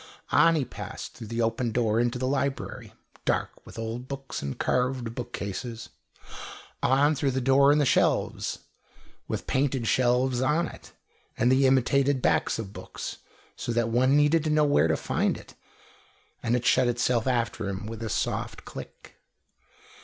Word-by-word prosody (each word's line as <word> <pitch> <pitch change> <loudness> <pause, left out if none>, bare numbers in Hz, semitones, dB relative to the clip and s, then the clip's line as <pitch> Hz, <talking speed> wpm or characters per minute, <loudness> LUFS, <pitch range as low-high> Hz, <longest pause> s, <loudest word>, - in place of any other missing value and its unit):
On 165 0 +5
he 145 -4 0
passed - - -8
through 110 - -9
the 115 +1 -1
open 115 +1 0
door 115 -1 +1
into 120 +1 +1
the 130 - -2
library, 135 0 -2 0.3
dark - - 0 0.2
with - - -11
old 115 +3 -5
books 135 0 -6
and 70 -1 -4
carved 125 -2 0
bookcases; 115 -1 -5 0.9
on 140 +3 +4
through 140 -1 0
the 130 0 0
door 135 +2 +5
in 145 - +4
the 145 - +3
shelves, - - +1 0.7
with - - -4
painted 130 -2 0
shelves 125 +2 +2
on 150 +6 +2
it, - - -11 0.5
and 120 - +3
the 135 +1 +4
imitated 135 +1 +3
backs - - +1
of 105 -3 -6
books, - - -7 0.4
so - - -4
that 115 -1 +1
one 130 +4 +3
needed 150 +2 +4
to 155 - -1
know 150 0 +3
where 80 - +3
to 80 - +1
find - - 0
it - - -14 0.9
and 115 +1 +1
it 125 0 -2
shut 130 -1 +4
itself 120 0 +1
after 115 -4 0
him 95 +1 -5
with 115 +1 -7
a 110 - -3
soft - - -2
click. - - -11
125 Hz, 165 wpm, -27 LUFS, 115-135 Hz, 0.9 s, On